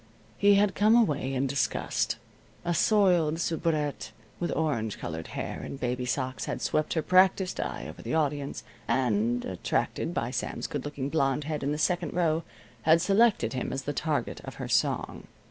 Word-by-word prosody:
He 200 0 +6
had 200 -1 +3
come 215 +3 +4
away 150 - +2
in 130 +1 +1
disgust. 140 +1 0 0.5
A 175 - +1
soiled 175 -5 +3
soubrette 160 -3 -1 0.3
with 175 - -1
orange 115 -10 -1
colored 80 -1 -5
hair - - -4
and 135 - -7
baby 125 0 -1
socks 130 0 -2
had - - -3
swept 155 - 0
her 160 - +1
practiced 185 +1 +3
eye - - -3
over - - -9
the - - -2
audience, 145 -2 -1 0.2
and, 120 -1 +1
attracted 90 -2 -1
by - - -2
Sam's - - -3
good - - -4
looking 145 -2 -3
blond 145 -2 +1
head 150 0 -3
in 140 +1 -1
the 150 - -1
second 175 +1 0
row, 165 -2 +2 0.4
had 160 +4 +5
selected 200 - +3
him 130 - -3
as 135 0 -3
the 145 - -3
target 145 -4 -2
of - - -8
her - - -5
song. - - 0
150 Hz, 175 wpm, -28 LUFS, 135-175 Hz, 0.5 s, He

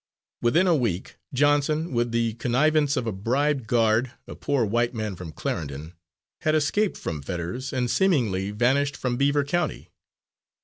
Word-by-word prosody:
Within 140 +11 +3
a 180 - +4
week, 110 - -2
Johnson, 145 +3 +2
with 120 0 0
the 115 -1 0
connivance 145 +5 +2
of 125 - -1
a 115 - -1
bribed 130 +6 0
guard, 115 +1 +2
a - - -8
poor 140 -5 0
white 120 +3 0
man 110 -3 -3
from 85 -3 -8
Clarendon, 75 +1 -5 0.5
had 155 0 +1
escaped 185 +8 +1
from 75 -3 -4
Fetters 90 - -4
and 130 -3 0
seemingly 120 - +1
vanished 130 +7 +1
from 125 -2 -1
Beaver 140 +2 +2
County. 155 +2 -2
125 Hz, 150 wpm, -25 LUFS, 110-145 Hz, 0.5 s, a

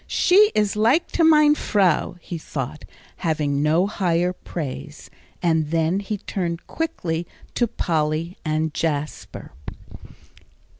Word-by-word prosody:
"She 415 +4 +5
is 210 -1 +1
like 230 +10 +2
to 335 - +1
mein 305 -2 +6
Frau," 195 - +1
he 170 - -6
thought, 145 0 -5 0.3
having 150 -3 0
no 160 +5 +3
higher 180 -3 0
praise. 140 - -7 0.3
And 160 -3 +2
then 165 +3 +1
he 205 +1 -3
turned 175 -3 -4
quickly 175 - -3 0.3
to 240 - +1
Polly 160 -2 -1
and 155 0 -1
Jasper. 150 -2 -3
170 Hz, 115 wpm, -23 LUFS, 155-205 Hz, 0.3 s, mein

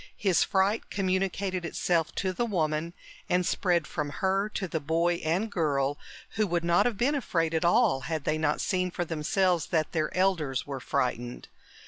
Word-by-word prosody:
His 190 -5 +3
fright 195 +3 +1
communicated 190 -1 -1
itself 170 -1 0
to 185 -1 -1
the 235 +6 -1
woman... 160 -3 -1 0.3
and 180 0 +2
spread 175 -3 +1
from 150 0 -3
her 195 +6 0
to 195 -2 -3
the 165 - -2
boy 165 +3 +1
and 180 +8 0
girl, 145 -5 0 0.3
who 215 0 0
would 170 -1 0
not 170 +6 +3
have 230 -4 -2
been 265 +7 +2
afraid 165 - 0
at 160 - +1
all 205 - +4
had 155 +2 -3
they 155 +1 0
not 150 -1 +1
seen 185 -2 0
for 175 0 -3
themselves 170 +2 +1
that 160 -4 0
their 155 -2 -1
elders 165 -9 +1
were 140 -2 -5
frightened. 120 -1 -2
175 Hz, 175 wpm, -28 LUFS, 155-190 Hz, 0.3 s, all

